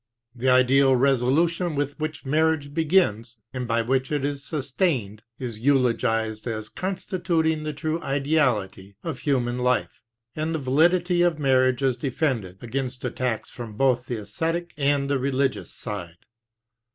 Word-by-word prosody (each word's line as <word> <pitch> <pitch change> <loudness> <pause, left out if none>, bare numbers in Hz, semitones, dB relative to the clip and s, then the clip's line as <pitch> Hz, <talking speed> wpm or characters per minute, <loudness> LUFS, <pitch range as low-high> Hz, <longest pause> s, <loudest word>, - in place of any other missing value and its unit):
The 130 +1 0
ideal 130 +1 +5
resolution 140 +7 +2
with 145 +1 -2
which 155 -1 -4
marriage 155 0 +1
begins, 150 - +1 0.2
and 125 -2 -3
by 115 0 +1
which 130 +3 0
it 145 -2 0
is 140 -1 -3
sustained, 130 - -1 0.2
is 120 -4 -5
eulogized 115 -4 +1
as 110 -2 -4
constituting 175 -4 -1
the 155 0 -3
true 160 +2 -2
ideality 130 -9 0
of 160 -6 -4
human 125 -4 0
life; 125 0 0 0.3
and 155 +1 -2
the - - +1
validity 170 +6 +2
of 175 -3 +3
marriage 130 -2 +2
is 130 -2 +2
defended 120 - -2
against 130 +1 -4
attacks 125 -2 -2
from 115 -3 -8
both 125 +1 +1
the 120 - -2
esthetic 165 +12 -3
and 140 -1 +1
the 140 -1 +1
religious 135 0 -1
side. 90 -6 -7
135 Hz, 140 wpm, -25 LUFS, 120-155 Hz, 0.3 s, ideal